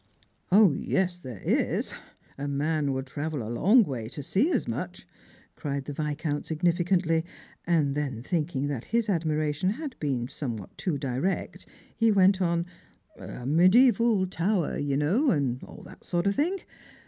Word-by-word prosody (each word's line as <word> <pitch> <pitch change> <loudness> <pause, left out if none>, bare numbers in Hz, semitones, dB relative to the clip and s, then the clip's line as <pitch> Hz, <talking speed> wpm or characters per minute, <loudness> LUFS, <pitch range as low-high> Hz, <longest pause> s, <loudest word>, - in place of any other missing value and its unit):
" - - -42
0, 200 -2 +7
yes, 180 -2 0
there 125 - -9
is: - - 0 0.4
a 140 +1 -4
man 145 +1 0
would 130 0 -2
travel 145 0 -4
a 115 - -4
long 215 - +5
way 125 - -4
to 140 +4 -7
see 205 - +2
as - - 0
much," - - -5 0.5
cried 140 -2 -4
the 145 - -5
Viscount 150 0 -2
significantly; 170 0 +1 0.4
and 155 -5 +2
then 135 -5 -3
thinking 150 -3 -1
that 135 -5 -4
his 230 -1 0
admiration 155 -1 0
had 275 +4 -4
been 130 -5 -1
somewhat 115 -9 -6
too 170 -6 -2
direct, 135 +7 -2 0.3
he 225 -1 +3
went 195 -1 +4
on 170 -1 +1 0.2
— - - -31
" - - -33
a 125 - -8
mediaeval 210 - +5
tower, 180 -1 0
you 140 -1 -1
know, 195 - +2
and 135 - 0
all - - -12
that - - -13
kind 175 -1 +1
of 200 - +3
thing. 335 - 0
160 Hz, 165 wpm, -27 LUFS, 140-190 Hz, 0.5 s, 0